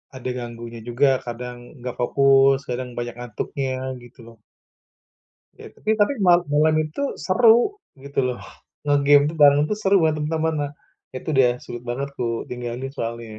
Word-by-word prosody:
ada 130 0 -5
ganggunya 120 -1 -7
juga. 130 +2 +2
Kadang 120 +1 -6 0.2
enggak 125 0 -6
fokus, 135 +1 +4
kadang 125 0 -4
banyak 120 -1 -4
ngantuknya, 130 +2 -4
gitu 120 +1 -17
loh. 115 -1 -15 1.2
Ya, - - -12
tapi 215 +1 -1
tapi 205 +7 +3
mal 175 0 +6
malam 155 +2 +3
itu 155 - -5 0.2
seru, 240 - +4 0.2
gitu 140 0 -8
loh. 125 -1 -4 0.4
Nge-game 145 0 +4
tuh, 165 - -9
bareng 145 0 +7
tuh 210 - 0
seru 200 -1 +3
banger 155 -1 +2
teman-teman, 160 +1 -1
nah. 140 - -9 0.4
Itu, 130 - -7
udah 125 -2 +4
sulit 120 0 -8
banget 135 +4 -3
kutinggalin 120 +2 -4
soalnya, 115 -2 -5
135 Hz, 150 wpm, -22 LUFS, 120-150 Hz, 1.2 s, bareng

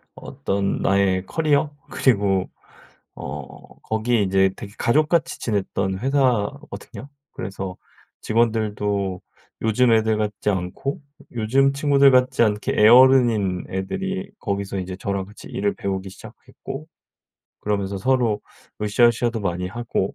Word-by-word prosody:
어떤 100 0 -3
나의 95 -1 +2
커리어 150 +2 +1 0.2
그리고 100 -6 +1 0.7
어 70 0 -9
거기 110 +1 0
이제 95 0 +3
되게 100 - -9
가족같이 155 +6 +1
지냈던 95 -3 -1
회사거든요. 130 -1 -1 0.2
그래서 95 -1 -6 0.4
직원들도 105 -4 0 0.4
요즘 115 +2 +3
애들 110 -1 +2
같지 105 0 -1
않고 95 - -3 0.3
요즘 130 +5 +2
친구들 140 -1 +4
같지 125 -1 +3
않게 105 -1 -1
애어른인 115 -5 +5
애들이 190 - -3
거기서 100 -2 -3
이제 95 0 -5
저랑 100 0 -3
같이 105 +3 -13
일을 100 0 -1
배우기 95 -1 -4
시작했고 135 +9 -10 0.7
그러면서 100 -1 -2
서로 120 -2 +1 0.4
으싸으싸도 115 +2 +2
많이 90 -2 -2
하고. 120 -3 -3
105 Hz, 275 characters per minute, -22 LUFS, 95-125 Hz, 0.7 s, 애어른인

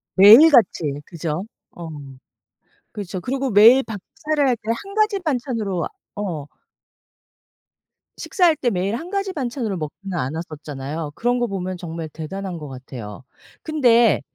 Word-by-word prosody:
매일 220 +12 +9
같이 230 - +4 0.2
그죠? 165 0 -4 0.3
어. 170 -1 -9 1.0
그렇죠. 190 -3 -6
그리고 265 +5 -2
매일 230 +6 +7
밥 220 -4 -7 0.2
차려야 300 -2 0
할 250 - +2
때 215 - -9
1 395 - -10
가지 425 -2 +2
반찬으로 240 - -2 0.3
어. 180 -9 -4 1.7
식사할 350 -5 +2
때 255 -4 0
매일 195 +1 -1
1 330 +9 -6
가지 395 -1 -2
반찬으로 240 - -3
먹지는 175 +4 -6
않았었잖아요. 150 0 -5
그런 245 +4 0
거 240 - 0
보면 185 -2 -4
정말 165 -2 -6
대단한 180 +4 -6
것 150 -2 -8
같아요. 125 -5 -9 0.4
근데 240 -7 +4
205 Hz, 270 characters per minute, -21 LUFS, 165-260 Hz, 1.7 s, 매일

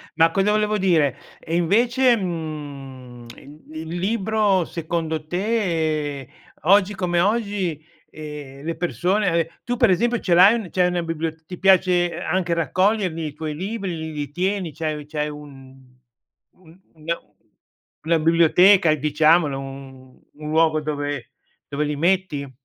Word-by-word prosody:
Ma 165 0 +4
cosa 195 +3 +1
volevo 210 0 +1
dire? 160 -8 +2 0.2
E 165 - -4
invece, 235 +8 +3
mhmm, 140 - -7
i 145 +2 -15 0.2
il 160 - -8
libro 205 -2 +1
secondo 160 -2 -4
te, 160 - -1 0.3
oggi 200 +4 +3
come 175 -2 0
oggi, 200 -5 0 0.3
ehm, 150 -2 -9
le 165 0 -2
persone 180 +2 0
e 165 0 -2
tu 245 -1 -3
per - - +4
esempio 235 +6 +1
ce 180 - 0
l'hai 190 +6 +7
un 210 -7 -5
c'hai 180 -1 +2
una 175 -1 -1
bibliot 160 -1 -4
ti 180 +1 -9
piace 180 -2 +3
anche 175 0 -1
raccoglierli 185 -1 0
i 145 - -8
tuoi 155 0 -5
libri, 195 +2 -4
l 160 0 -6
li 145 -1 -5
tieni, 185 -1 -2
c'hai 155 -1 -4
c'hai 150 0 -3
un 140 -3 -12 0.8
un 175 0 -20
una 165 +2 -4 0.9
una 165 0 +3
biblioteca 170 +2 +5
diciamolo, 150 0 +2
un 135 -1 -11
un 150 0 -8
luogo 155 0 +2
dove 145 -3 -4 0.3
dove 145 +1 -2
li 150 0 -2
metti? 165 -4 0
165 Hz, 140 wpm, -22 LUFS, 150-190 Hz, 0.9 s, l'hai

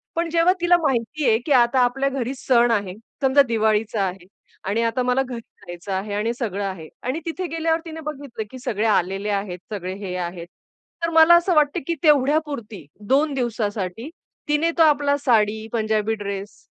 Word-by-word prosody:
पण 335 0 -1
जेव्हा 340 +2 +4
तिला 350 0 +5
माहिती 270 +1 -1
आहे 220 0 +3
की 300 - -3
आता 250 0 +4
आपल्या 270 +3 +1
घरी 265 -1 -3
सण 240 -2 +3
आहे. 200 -4 -1 0.3
समजा 270 +1 +5
दिवाळीचा 220 -1 +1
आहे 185 -1 -4 0.4
आणि 225 +3 0
आता 230 +2 0
मला 250 +2 +2
घरी 250 -3 -6
जायचं 175 -2 -11
आहे 200 +2 -3
आणि 215 +3 -1
सगळं 205 -5 -3
आहे 185 -5 -6 0.2
आणि 255 +6 -2
तिथे 350 +2 -3
गेल्यावर 325 0 0
तिने 320 0 -7
बघितलं, 285 -6 -6
की 260 - -9
सगळे 220 -3 -2
आलेले 195 0 0
आहेत, 195 -3 -2
सगळे 185 -2 -4
हे 180 - -4
आहेत. 175 -1 -5 0.6
तर 335 - +1
मला 325 +1 +7
असं 345 +2 +3
वाटतं 295 -1 +3
की 340 - 0
तेवढ्यापुरती, 285 - +1 0.2
2 285 +4 +2
दिवसासाठी, 225 -2 -3 0.4
तिने 300 +3 +2
तो 325 - +6
आपला 285 -2 +3
साडी, 220 -4 +1
पंजाबी 220 -1 0
ड्रेस 200 0 -6
235 Hz, 175 wpm, -22 LUFS, 205-290 Hz, 0.6 s, मला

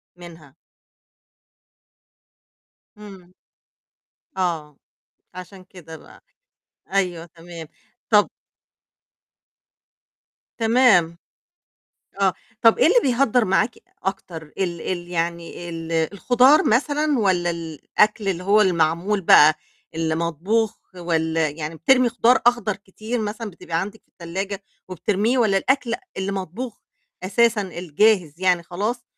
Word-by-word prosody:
منها؟ 165 -5 -14 2.4
إمم. 190 -4 -13 1.0
آه، 165 -6 -2 0.6
عشان 185 +1 -11
كده 175 -4 -12
بقى. - - -18 0.7
أيوة، 180 -4 -1
تمام. 170 -1 -11 0.4
طب 210 -2 +4 2.3
تمام. 225 -8 +3 1.0
آه. 190 -2 +2 0.3
طب 230 -1 +5
إيه - - +5
اللي 390 +9 +5
بيهدّر 250 -2 +2
معاكِ 195 +4 +1 0.3
أكتر؟ 185 -3 -5 0.2
ال 175 -3 -2
ال 175 0 -4
يعني 170 0 -4
ال 165 -1 -6
الخضار 245 - +3
مثلًا 290 +4 +1
والّا 185 -5 +1
الأكل 170 +6 -1
اللي 180 -2 -2
هو 205 +3 +4
المعمول 175 +2 +1
بقى، 155 -3 +6 0.4
اللي 160 0 -1
مطبوخ 170 +7 -1 0.2
والّا 165 -2 -1
يعني 150 +2 -6
بترمي 255 +10 +3
خضار 240 +2 +3
أخضر 240 -4 +2
كتير 215 +4 -6
مثلًا 215 +1 -5
بتبقى 170 -2 -4
عندِك 205 +4 -7
في - - -44
التلاجة 190 +3 -6 0.3
وبترميه، 210 +7 0
والّا 215 -5 +2
الأكل 260 +2 0 0.2
اللي 190 +1 -3
مطبوخ 195 +5 -6 0.4
أساسًا 220 +4 +2
الجاهز 180 -1 0
يعني 180 -2 +2
خلاص، 205 +8 -4
190 Hz, 105 wpm, -22 LUFS, 170-220 Hz, 2.4 s, بقى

